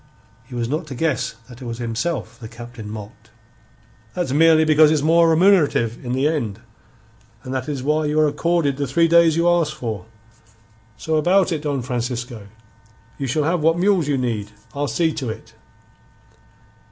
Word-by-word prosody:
He 125 - -11
was 120 -1 -2
not 155 +5 -3
to 135 - -7
guess 155 -5 -1
that 125 0 -13
it - - -7
was 115 -1 -5
himself 120 +1 -3
the 115 - -8
Captain 120 -1 -10
mocked. 110 +1 -10 0.9
"That's 175 -7 -2
merely 160 +2 +5
because 155 0 +5
it's 150 -2 +1
more 165 +1 +4
remunerative 160 - +3
in 125 -1 -3
the 135 +3 +1
end. 120 -10 -2 0.8
And 130 - -6
that 130 +1 -3
is 140 -3 -4
why 155 +2 +1
you 150 +1 0
are 155 - +4
accorded 150 -1 0
the 140 -1 -2
three 165 +6 +3
days 165 -1 +4
you 170 +1 +2
ask 170 -3 +2
for. 110 -9 -5 0.9
So 160 0 -1
about 180 +5 +3
it, 160 -3 -2
Don 140 -4 -2
Francisco. 120 -3 -4 0.7
You 135 - -2
shall 150 +5 0
have 165 +2 0
what 165 +2 +3
mules 185 -4 +2
you 145 -2 +1
need. 115 -5 -2 0.2
I'll 145 +1 -2
see 160 +2 0
to 135 -6 -4
it." 110 0 -9
145 Hz, 175 wpm, -21 LUFS, 120-160 Hz, 0.9 s, merely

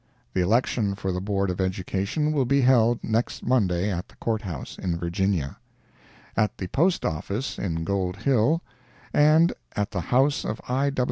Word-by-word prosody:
The 95 - +1
election 105 +1 +1
for 95 -1 -3
the 90 0 -2
Board 100 -1 0
of 90 - -3
Education 95 - -1
will 140 -4 +1
be 140 +3 +3
held 120 -2 +4
next 110 +2 -1
Monday, 100 -6 +2
at 90 +3 -3
the - - -20
Court 110 -2 -1
House, 85 - -6
in 85 -3 -1
Virginia; 85 -4 -1 0.8
at 105 - +1
the 95 - -4
Postoffice, 125 - 0
in 80 -4 -2
Gold 95 0 -1
Hill, 140 - +2 0.5
and 155 +3 +5 0.2
at 105 0 -1
the 90 - -2
house 135 - +2
of 105 - -3
I. 135 +3 +1
105 Hz, 160 wpm, -25 LUFS, 95-130 Hz, 0.8 s, and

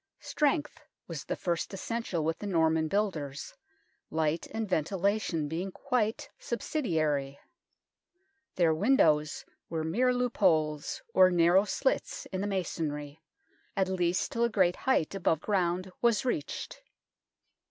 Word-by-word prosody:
Strength 300 0 0 0.3
was 165 -4 -6
the - - -2
first 175 +2 -2
essential 210 -5 -2
with 160 +1 -1
the 205 - -5
Norman 160 -3 +2
builders, 155 -8 -2 0.6
light 160 +1 0
and 220 0 -3
ventilation 185 -1 0
being 175 +5 -3
quite 220 +1 -1
subsidiary. 155 - -1 1.2
Their 170 -3 +3
windows 155 - +2 0.2
were 160 -1 -2
mere 235 +11 +2
loop 250 -1 -1
holes, 155 -2 +1
or 185 -1 +7
narrow 175 +2 +4
slits - - -1
in 185 -1 -2
the 205 - -1
masonry, 155 -6 -3 0.6
at 190 -1 +2
least 180 -1 0
till 235 - 0
a 235 - +3
great 185 -5 +3
height 260 -12 +1
above 175 -5 +1
ground 185 -1 0
was 235 0 +3
reached. 155 - -3
180 Hz, 125 wpm, -30 LUFS, 160-210 Hz, 1.2 s, or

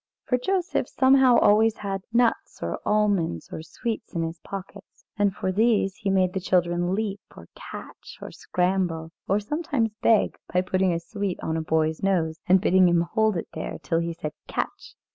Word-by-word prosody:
For 250 - +1
Joseph 375 +5 -1
somehow 260 -2 +5
always 220 +2 +4
had 195 -2 -4
nuts 235 0 +1
or - - -3
almonds 200 - +1
or - - -5
sweets 215 +6 -5
in 165 - 0
his 165 0 -5
pockets, 195 +1 -10
and 205 -1 +2
for 190 -1 -2
these 205 -2 +2
he 200 - -2
made 185 -1 +2
the 190 - -1
children 175 0 +1
leap, 205 -2 -2 0.2
or 85 - -12
catch, - - -10
or - - -8
scramble, 180 -3 -1 0.2
or 200 +2 +2
sometimes 280 -1 -1
beg, 225 -2 +3
by 180 - +2
putting 185 0 +1
a 165 - 0
sweet 200 +1 -4
on 160 - -1
a 160 - -1
boy's 160 0 0
nose 165 -5 0
and 185 +1 +6
bidding 185 -1 +5
him 170 -1 +3
hold 220 -3 +2
it - - -5
there, 160 - -5
till 165 - 0
he 170 0 -2
said 155 -2 -6
"Catch!" - - -4
190 Hz, 180 wpm, -25 LUFS, 170-215 Hz, 0.2 s, and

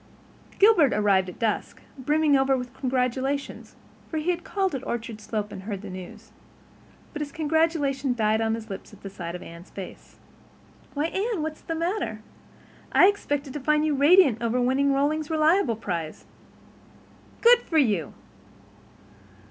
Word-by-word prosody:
Gilbert 390 - +5
arrived 195 -3 +2
at 180 - -11
dusk, 220 -2 -2 0.2
brimming 295 +2 +2
over 270 0 +3
with 250 -1 -6
congratulations, 260 +2 -2 0.3
for 320 - -3
he 315 +4 +1
had 350 0 -4
called 385 -3 -1
at 265 -1 -4
Orchard 230 -3 -5
Slope 210 -1 -4
and 190 - -7
heard 200 0 -6
the 200 - -7
news. 185 -1 -10 0.8
But 300 - -5
his 290 -1 -4
congratulations 295 -5 0
died 220 0 +2
on 225 0 +1
his 225 -1 -8
lips 200 0 -9
at 195 -1 -10
sight 170 -2 -6
of 180 - -8
Anne's 170 +3 -12
face. 195 -2 -10 0.8
"Why, 290 +2 0
Anne, 385 +1 -2
what 315 0 -3
is - - -21
the 330 - -4
matter? 335 - -2 0.7
I - - +6
expected 290 -9 -3
to 295 - -4
find 300 +2 +2
you 305 - +1
radiant 285 - +5
over 235 +1 0
winning 265 +3 +2
Rollings 295 +2 0
Reliable 315 - +3
prize. 170 -7 -5 1.2
Good 480 +1 +7
for 325 - -2
you!" 210 - +1
270 Hz, 155 wpm, -25 LUFS, 215-310 Hz, 1.2 s, Good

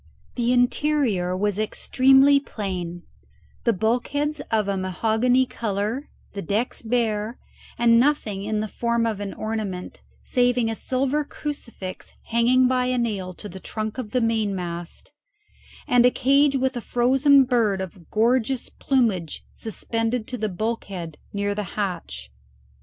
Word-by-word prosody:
The 240 -1 0
interior 245 -7 +1
was 205 +1 0
extremely 270 +5 +4
plain: 180 -8 -5 0.6
the 235 - +5
bulkheads 250 +8 0
of 215 -3 +1
a 200 - 0
mahogany 220 +7 +2
colour, 220 +4 -3 0.2
the 200 - -4
decks 210 +8 -2
bare, 225 -1 -1 0.4
and 230 0 +5
nothing 235 -8 +1
in 215 0 -1
the 215 - -2
form 235 +2 0
of 220 -3 -1
an 200 -1 -4
ornament 215 -4 -4 0.2
saving 245 -2 +2
a - - -3
silver 270 +5 0
crucifix 255 -11 -7
hanging 245 +2 +4
by 255 0 +1
a 255 0 0
nail 200 -6 -2
to 210 - -9
the 190 -1 -9
trunk 215 +4 -4
of 235 -5 -4
the 250 +3 0
mainmast, 195 -7 -2 0.8
and 245 -1 +5
a 250 - +7
cage 275 +3 +3
with 265 0 0
a 240 - -3
frozen 265 +4 +4
bird 230 -6 +1
of 185 -2 -8
gorgeous 240 +3 +1
plumage 215 - 0
suspended 225 +1 -2
to 250 - -4
the 215 0 -1
bulkhead 190 -5 -4
near 205 0 -1
the 205 -2 -6
hatch. 165 - -4
225 Hz, 140 wpm, -24 LUFS, 200-250 Hz, 0.8 s, a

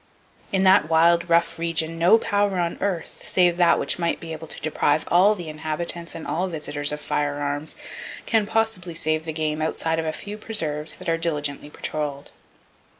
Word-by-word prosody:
In 190 -1 +2
that 185 -5 +5
wild, 170 +1 +4
rough 170 0 +2
region, 165 0 -1
no 175 +6 +6
power 205 -3 +1
on 170 -1 -1
earth,—save 180 -1 +1
that 175 -1 +5
which - - -1
might 170 -1 0
be 165 -1 -6
able 160 +1 -8
to - - -8
deprive 155 0 +1
all 195 +5 +5
the 175 -4 -7
inhabitants 160 +2 -4
and 165 - -7
all 170 +6 -1
visitors 150 -3 -3
of 150 - -4
firearms,—can 145 +9 -2
possibly 215 -6 0
save 155 0 0
the 160 - -2
game 155 0 -2
outside 160 +1 0
of 160 - -2
a - - +1
few 205 +5 -7
preserves 155 -9 -2
that 185 - -10
are 165 0 +1
diligently 150 -3 -1
patroled. 145 -2 -4
165 Hz, 170 wpm, -24 LUFS, 155-180 Hz, -, no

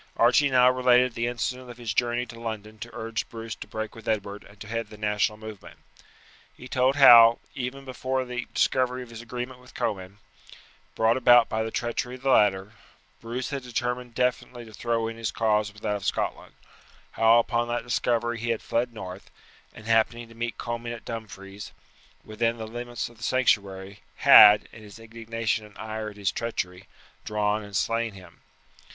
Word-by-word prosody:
Archie 125 +5 +4
now 125 -1 +5
related 125 -1 +3
the 115 +1 -2
incident 125 +1 -3
of 120 - -10
his 115 -3 -4
journey 120 +2 0
to 115 -2 -12
London 110 -2 -6
to 120 - -7
urge 115 -2 -4
Bruce 115 -1 -7
to - - -10
break 110 0 -5
with 115 -2 -13
Edward 105 -2 -2
and 100 0 -19
to - - -9
head 115 0 -3
the 105 - -13
national 105 0 0
movement. 110 -2 -11 0.8
He 125 - -10
told 130 +1 +2
how, 120 -4 +9 0.2
even 135 0 -5
before 130 0 -2
the 125 0 -5
discovery 130 -1 +1
of 120 - -14
his 115 -1 -8
agreement 125 +2 -6
with 125 0 -18
Comyn, 95 -2 -3 0.8
brought 110 +2 +3
about 120 -2 +6
by 110 - -1
the 110 - -2
treachery 120 +2 -3
of 130 - -15
the 135 - +2
latter, 100 -2 +3 0.5
Bruce 120 +4 -4
had 140 -1 -3
determined 125 0 -4
definitely 125 -1 -1
to 110 - -14
throw 115 +1 -1
in 115 0 -6
his 115 -1 -2
cause 105 -2 0
with 105 +1 -17
that 105 -1 0
of 100 - -11
Scotland; - - -3 0.6
how 115 +1 +5
upon 120 0 +1
that 120 0 -2
discovery 120 -1 -1
he 120 +1 -3
had 115 -2 -1
fled 120 +1 -1
north, 95 -3 -8 0.4
and, 110 - -14
happening 115 +1 +1
to - - -14
meet 115 0 -4
Comyn 120 0 -4
at 115 - -13
Dumfries, 100 -3 -8 0.5
within 115 +2 -1
the 110 - -6
limits 120 +1 -5
of 120 - -16
the 110 - -12
sanctuary, 100 -5 0 0.2
had, 105 0 +8
in 110 - -12
his 105 -1 -13
indignation 115 0 -3
and 105 -1 -15
ire 110 0 -5
at 105 - -14
his 100 -2 0
treachery, 95 -5 -4 0.4
drawn 105 0 -1
and 100 -1 -10
slain 115 +1 0
him. 90 -3 -15
115 Hz, 185 wpm, -26 LUFS, 105-120 Hz, 0.8 s, how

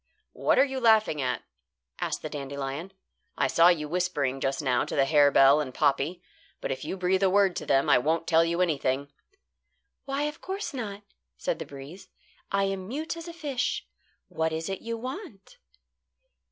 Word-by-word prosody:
"What - - +2
are - - +6
you 265 -1 -4
laughing 220 - +4
at?" 125 -3 -1 0.6
asked - - -3
the - - -4
dandelion. 140 +4 -5 0.5
"I - - +2
saw 165 +1 +5
you 160 -4 +3
whispering 150 -6 -1
just 135 0 -1
now 130 -4 +1
to - - -5
the 135 - +4
harebell 145 0 +6
and 130 -4 -6
poppy; 150 +4 +1 0.4
but - - -3
if 130 0 -4
you 190 - -4
breathe 185 +1 +1
a 195 - +4
word 195 -1 +3
to - - -5
them, 135 0 +3
I - - +6
won't 160 +5 0
tell 165 0 +4
you 170 +1 0
anything." 140 -4 0 0.9
"Why, 275 +1 -1
of 300 +1 -4
course 385 -1 -4
not," 210 -5 -5 0.3
said - - -2
the - - -6
breeze. 140 +7 -10 0.4
"I 195 0 +2
am 195 -1 -2
mute 305 +8 -4
as 335 0 -8
a - - -5
fish. 295 -7 -2 0.4
What 160 0 -1
is 160 +2 -3
it 195 - -4
you 230 0 -4
want?" 260 - -8
175 Hz, 180 wpm, -27 LUFS, 140-225 Hz, 0.9 s, are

